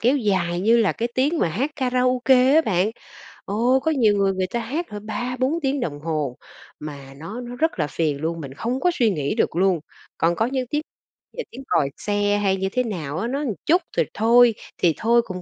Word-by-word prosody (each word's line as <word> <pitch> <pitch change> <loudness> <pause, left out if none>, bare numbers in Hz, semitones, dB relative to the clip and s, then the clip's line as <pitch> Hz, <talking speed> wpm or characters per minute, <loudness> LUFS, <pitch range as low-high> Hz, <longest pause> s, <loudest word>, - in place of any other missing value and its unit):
kéo 255 +5 +3
dài 185 -7 0
như 225 +4 +4
là 225 -3 +3
cái 235 - -2
tiếng 290 +6 +1
mà - - +2
hát 255 - -1
karaoke 255 0 +3
á 320 - +7
bạn, 195 - +1 0.6
ồ, 240 +6 +2
có 320 +4 0
nhiều 225 -8 +3
người 195 -1 +2
người 185 -1 -1
ta 235 - -3
hát 280 +10 -3
hả 210 -1 -6
3-4 250 +8 -2
tiếng 275 0 0
đồng 145 - -3
hồ, 150 -5 -2 0.4
mà 140 -3 -8
nó 195 - -7
nó 245 0 -7
rất 320 - 0
là 150 - +1
phiền 150 -1 -1
luôn, 165 +1 -2
mình 135 -2 -8
không 240 - -2
có 355 +4 +2
suy 240 -9 +2
nghĩ 150 +2 -2
được 220 - 0
luôn. 185 -1 +2 0.4
Còn 170 +1 +2
có 225 - +1
những 255 0 -2
tiếng 295 - 0 0.6
là 485 - -2
tiếng 265 +3 -9
còi 140 - +2
xe 205 0 0
hay 195 -2 +1
như 190 0 -1
thế 250 +3 +1
nào 160 - -4
á, 225 +7 -1
nó 275 +3 -2
một 265 -8 -2
chút 350 +4 +4 0.2
rồi - - +3
thôi 235 +1 +5 0.2
thì 170 -2 +3
thôi 235 +2 +3
cũng 185 -1 -6
220 Hz, 225 wpm, -23 LUFS, 175-255 Hz, 0.6 s, á